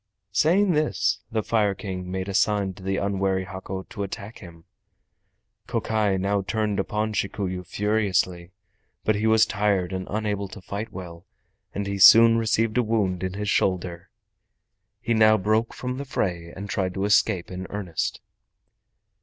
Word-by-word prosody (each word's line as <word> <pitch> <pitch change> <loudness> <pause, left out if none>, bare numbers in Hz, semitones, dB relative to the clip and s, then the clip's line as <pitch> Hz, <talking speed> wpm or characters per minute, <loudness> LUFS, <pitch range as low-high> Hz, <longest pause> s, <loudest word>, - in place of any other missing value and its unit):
Saying 180 - +3
this, 150 - +1
the 110 -1 -1
Fire 105 -3 +1
King 90 -3 -6
made 95 +1 -3
a 100 - -4
sign 100 -1 +1
to 95 - -14
the 95 +1 -1
unwary 95 -1 0
Hako 95 +1 -6
to 100 - -8
attack 100 +2 -6
him. 85 -3 -13 1.0
Kokai 105 -3 0
now 100 +2 0
turned 105 0 -1
upon 105 +2 -1
Shikuyu 95 -2 -2
furiously, 95 -3 0 0.5
but 110 - +2
he 105 +2 0
was 110 0 +5
tired 100 -4 0
and 95 0 -4
unable 105 -1 -2
to 105 +3 -10
fight 105 +4 -6
well, 85 -2 -9 0.5
and 100 - -2
he 100 0 -3
soon 115 +3 +8
received 115 +1 +1
a - - +5
wound 105 -5 0
in 95 -1 -3
his 105 0 -2
shoulder. 90 -1 -1 0.9
He 115 - 0
now 110 -1 +5
broke 110 +3 +1
from 125 +1 -5
the 140 - -5
fray 85 -9 -2
and 100 +3 -7
tried 95 -2 -2
to 95 0 -1
escape 100 -3 +2
in 95 0 -6
earnest. 95 -6 -3
100 Hz, 160 wpm, -25 LUFS, 95-110 Hz, 1.0 s, soon